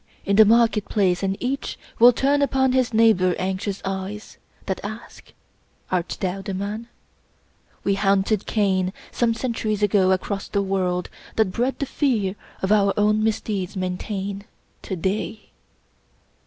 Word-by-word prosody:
in 200 Hz, -, +2 dB
the 220 Hz, +1 st, +8 dB
market 225 Hz, -1 st, +4 dB
place, 185 Hz, -4 st, +1 dB
and 195 Hz, 0 st, -1 dB
each 270 Hz, +3 st, -3 dB, 0.2 s
Will 240 Hz, +2 st, +9 dB
turn 280 Hz, +4 st, +1 dB
upon 265 Hz, -2 st, +2 dB
his 255 Hz, -2 st, +2 dB
neighbor 215 Hz, -6 st, +4 dB
anxious 190 Hz, +1 st, -3 dB
eyes 195 Hz, +2 st, -5 dB, 0.3 s
That 190 Hz, -, -2 dB
ask 215 Hz, +3 st, -9 dB
:— -, -, -40 dB
' -, -, -41 dB
* -, -, -32 dB
Art 180 Hz, -2 st, -1 dB
thou 190 Hz, +1 st, -2 dB
the 195 Hz, -1 st, -4 dB
man? 205 Hz, +4 st, -4 dB, 0.5 s
" -, -, -37 dB
We 200 Hz, -, +2 dB
himted 200 Hz, +1 st, +1 dB
Cain 190 Hz, -3 st, +1 dB, 0.2 s
Some 230 Hz, -1 st, +1 dB
centuries 225 Hz, -4 st, -2 dB
ago, 190 Hz, -2 st, +3 dB
across 195 Hz, +1 st, -1 dB
the 200 Hz, -1 st, 0 dB
worid, 185 Hz, -2 st, -1 dB, 0.3 s
That 220 Hz, -4 st, +2 dB
bred 250 Hz, +6 st, -1 dB
the 280 Hz, -, -2 dB
fear 225 Hz, -10 st, 0 dB, 0.3 s
our 200 Hz, -1 st, +3 dB
own 210 Hz, +1 st, +3 dB
misdeeds 205 Hz, -3 st, -2 dB
maintain 195 Hz, +2 st, -4 dB, 0.4 s
To 190 Hz, -, -4 dB
day. 195 Hz, +4 st, -3 dB
200 Hz, 155 wpm, -23 LUFS, 190-225 Hz, 0.5 s, Will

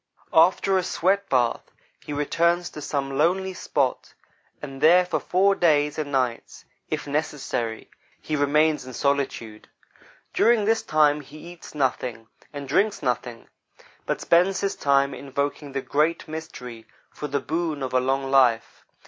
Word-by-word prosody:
After 190 Hz, +3 st, +4 dB
a -, -, -2 dB
sweat 195 Hz, +4 st, 0 dB
bath, 125 Hz, -3 st, 0 dB, 0.3 s
he -, -, -8 dB
retires 170 Hz, +4 st, 0 dB
to 150 Hz, -, -9 dB
some 135 Hz, -1 st, -3 dB
lonely 190 Hz, +4 st, +1 dB
spot, 140 Hz, -7 st, -2 dB, 0.4 s
and 135 Hz, -2 st, -9 dB
there, 180 Hz, +3 st, +6 dB
for -, -, -1 dB
four 195 Hz, +2 st, +2 dB
days 150 Hz, -5 st, +2 dB
and 145 Hz, -2 st, -4 dB
nights, 125 Hz, -4 st, -2 dB, 0.2 s
if -, -, -3 dB
necessary, 140 Hz, -6 st, -3 dB, 0.3 s
he 155 Hz, -, -3 dB
remains 150 Hz, +1 st, +2 dB
in 130 Hz, 0 st, -10 dB
solitude. 130 Hz, -6 st, -2 dB, 0.7 s
During 230 Hz, -3 st, +3 dB
this 225 Hz, +1 st, +2 dB
time 150 Hz, -1 st, +2 dB
he 145 Hz, +2 st, -14 dB
eats 175 Hz, -3 st, -13 dB
nothing; 125 Hz, -4 st, -2 dB, 0.4 s
drinks 195 Hz, +7 st, 0 dB
nothing; 120 Hz, -2 st, -3 dB, 0.6 s
but -, -, -1 dB
spends 180 Hz, +3 st, +3 dB
his 200 Hz, -1 st, -1 dB
time 140 Hz, 0 st, +2 dB
invoking 140 Hz, +1 st, -4 dB
the 135 Hz, 0 st, -3 dB
Great 155 Hz, +3 st, 0 dB
Mystery 125 Hz, -8 st, -8 dB, 0.2 s
for 150 Hz, -, -6 dB
the 140 Hz, 0 st, -1 dB
boon 160 Hz, -2 st, -3 dB
of 130 Hz, -, -4 dB
a 130 Hz, -, +4 dB
long 135 Hz, +1 st, -1 dB
life. 125 Hz, -4 st, +2 dB
145 Hz, 145 wpm, -24 LUFS, 135-170 Hz, 0.7 s, there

